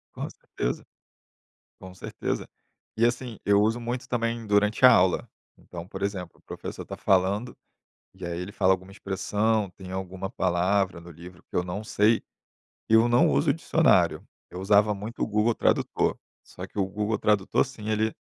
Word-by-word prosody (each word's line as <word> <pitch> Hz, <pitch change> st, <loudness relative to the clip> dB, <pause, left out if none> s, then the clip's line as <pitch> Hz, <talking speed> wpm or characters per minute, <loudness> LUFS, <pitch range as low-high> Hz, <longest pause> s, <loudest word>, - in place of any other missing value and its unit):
Com -, -, -4 dB
certeza. -, -, -4 dB, 0.9 s
Com 95 Hz, 0 st, -11 dB
certeza. 95 Hz, -, -4 dB, 0.5 s
E 115 Hz, -, +3 dB
assim, 120 Hz, -1 st, -1 dB
eu 100 Hz, 0 st, +4 dB
uso 110 Hz, +3 st, +2 dB
muito, 120 Hz, +1 st, -4 dB
também, 115 Hz, -1 st, -2 dB
durante 105 Hz, +3 st, +2 dB
a 130 Hz, -, +11 dB
aula. 90 Hz, -1 st, +3 dB, 0.3 s
Então, 85 Hz, 0 st, -9 dB
por -, -, -8 dB
exemplo, 95 Hz, -4 st, -4 dB
o -, -, -29 dB
professor -, -, -7 dB
tá -, -, -7 dB
falando, 100 Hz, +5 st, +1 dB, 0.6 s
e 95 Hz, -1 st, -10 dB
aí 85 Hz, 0 st, -4 dB
ele 90 Hz, +3 st, -6 dB
fala 95 Hz, -2 st, +3 dB
alguma 95 Hz, +1 st, -4 dB
expressão, 105 Hz, +2 st, -1 dB
tem 90 Hz, +1 st, -11 dB
alguma 95 Hz, 0 st, -5 dB
palavra 95 Hz, 0 st, +1 dB
no 85 Hz, +1 st, -12 dB
livro, 85 Hz, +2 st, -13 dB
que -, -, -5 dB
eu 90 Hz, -, +1 dB
não 90 Hz, +4 st, -4 dB
sei, 110 Hz, +1 st, +2 dB, 0.7 s
eu 110 Hz, +1 st, +5 dB
não 120 Hz, -9 st, +4 dB
uso 70 Hz, 0 st, +2 dB
o -, -, +5 dB
dicionário. -, -, +2 dB, 0.2 s
Eu 90 Hz, -, -7 dB
usava 105 Hz, +2 st, +4 dB
muito 105 Hz, +4 st, -6 dB
o -, -, +2 dB
Google 110 Hz, +2 st, +1 dB
Tradutor, -, -, +1 dB, 0.3 s
só -, -, -9 dB
que -, -, -11 dB
o 95 Hz, -, +2 dB
Google 105 Hz, +3 st, -2 dB
Tradutor, 105 Hz, -2 st, +2 dB
sim, 115 Hz, -6 st, -9 dB
ele 110 Hz, 0 st, 0 dB
100 Hz, 175 wpm, -26 LUFS, 95-110 Hz, 0.9 s, a